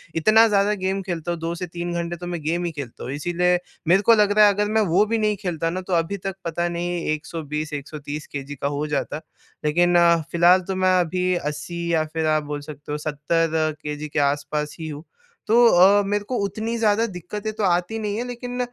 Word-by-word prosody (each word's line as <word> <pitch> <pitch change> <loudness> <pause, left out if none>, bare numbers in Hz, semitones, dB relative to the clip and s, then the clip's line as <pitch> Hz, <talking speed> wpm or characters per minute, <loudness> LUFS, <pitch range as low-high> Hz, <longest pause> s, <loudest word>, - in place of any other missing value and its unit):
इतना 215 +7 +5
ज़्यादा 205 -1 +2
गेम 195 +1 0
खेलता 175 -2 -4
हूँ, 170 - -3
2 165 +1 -3
से 180 +1 -5
3 175 +1 -5
घंटे 170 0 -3
तो 175 - -7
मैं 175 -2 -4
गेम 170 +3 -1
ही 170 - -2
खेलता 140 -6 -8
हूँ। 130 - -5
इसीलिए 175 +4 +1 0.3
मेरे 185 +3 +5
को 230 +3 +6
लग 210 -1 +3
रहा 210 0 +6
है, 205 - +4
अगर 205 +1 0
मैं 220 0 +3
वो 205 +3 +5
भी 225 +1 0
नहीं 215 -1 +1
खेलता 165 -3 -1
ना, 185 +2 -3
तो 185 0 -5
अभी 170 +4 0
तक 195 0 -5
पता 170 +1 -1
नहीं, 175 0 -3
120, 155 -1 -5
130 145 +1 -6
केजी 140 0 -6
का 140 - -2
हो 150 - -1
जाता। 150 +1 -2 0.4
लेकिन, 175 +4 +3 0.4
फ़िलहाल 175 +2 +5
तो 190 - -2
मैं 185 -1 +3
अभी 180 +2 0
80 150 +2 -4
या 160 - +3
फिर 160 -1 -1
आप 155 -1 +2
बोल 145 0 -5
सकते 145 0 -9
हो, 150 - -1
70 155 +1 0
केजी 150 0 -5
के 150 - -1
आस-पास 145 +1 -1
ही 160 - -5
हूँ। 150 0 -7 0.4
तो 220 - +3
अ, 195 +2 +6
मेरे 205 +1 -1
को 250 +5 -4
उतनी 220 +4 -3
ज़्यादा 225 0 +2
दिक्कतें 205 +3 -5
तो 215 0 -3
आती 180 +4 +1
नहीं 210 0 -2
हैं, 240 - -2
लेकिन 245 0 -6
175 Hz, 220 wpm, -23 LUFS, 155-200 Hz, 0.4 s, को